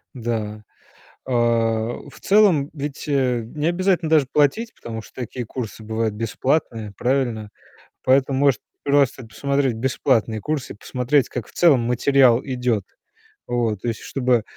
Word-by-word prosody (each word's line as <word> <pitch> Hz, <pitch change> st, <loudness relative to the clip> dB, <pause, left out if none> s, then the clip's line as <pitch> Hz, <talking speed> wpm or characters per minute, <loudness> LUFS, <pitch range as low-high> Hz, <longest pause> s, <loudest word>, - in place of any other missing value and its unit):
Да. 110 Hz, -3 st, -3 dB, 0.6 s
А, 130 Hz, -, -3 dB, 0.8 s
в -, -, -16 dB
целом, 195 Hz, -9 st, +4 dB
ведь, 145 Hz, -2 st, -5 dB
э, 130 Hz, -4 st, +1 dB
необязательно 170 Hz, -, 0 dB
даже 150 Hz, -4 st, +4 dB
платить, 150 Hz, +11 st, +2 dB
потому 115 Hz, -1 st, -7 dB
что -, -, -17 dB
такие 125 Hz, -1 st, -5 dB
курсы 115 Hz, -3 st, -6 dB
бывают 110 Hz, 0 st, -2 dB
бесплатные. 115 Hz, -1 st, -1 dB
Правильно? 120 Hz, -5 st, -1 dB, 0.5 s
Поэтому 130 Hz, +1 st, +3 dB
может 140 Hz, -4 st, +3 dB, 0.2 s
просто 140 Hz, -3 st, +2 dB
посмотреть 140 Hz, +2 st, 0 dB
бесплатные 115 Hz, -2 st, 0 dB
курсы 145 Hz, +4 st, -3 dB
и -, -, -15 dB
посмотреть, 125 Hz, +4 st, 0 dB
как 120 Hz, -4 st, -5 dB
в -, -, -17 dB
целом 160 Hz, -8 st, +5 dB
материал 125 Hz, +1 st, +4 dB
идёт. 125 Hz, -6 st, -1 dB, 0.6 s
Вот, 115 Hz, -5 st, -1 dB
то -, -, -2 dB
есть 115 Hz, -1 st, -3 dB
чтобы, 125 Hz, -4 st, +1 dB
130 Hz, 135 wpm, -22 LUFS, 115-140 Hz, 0.8 s, целом